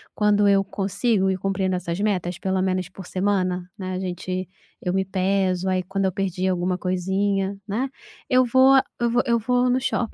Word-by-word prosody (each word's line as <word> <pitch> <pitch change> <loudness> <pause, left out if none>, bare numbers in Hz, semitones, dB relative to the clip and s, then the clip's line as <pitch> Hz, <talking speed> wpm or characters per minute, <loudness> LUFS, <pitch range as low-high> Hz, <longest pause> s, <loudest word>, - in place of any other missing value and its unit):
quando 210 -1 +3
eu 195 -1 +4
consigo 200 +1 0
ir 185 - -1
cumprindo 190 -1 0
essas 175 0 -3
metas, 180 -4 -1
pelo 190 -1 0
menos 185 -1 -1
por 190 0 -11
semana, 185 -2 -1
né, 185 -2 -4
a 185 - -2
gente 185 0 -4 0.3
eu 180 - -1
me 190 0 +1
peso, 190 -1 0
aí 185 0 0
quando 195 +2 -2
eu 190 - +1
perdi 190 -1 -1
alguma 180 0 0
coisinha, 190 +2 -1
né, 240 +7 -1 0.4
eu 255 -1 +4
vou 260 +2 +6 0.2
eu 235 - +1
vou 245 +1 +2
eu 235 -2 +2
vou 250 +2 +1
no 250 +1 +2
shopping 240 -3 -1
190 Hz, 190 wpm, -23 LUFS, 185-205 Hz, 0.4 s, vou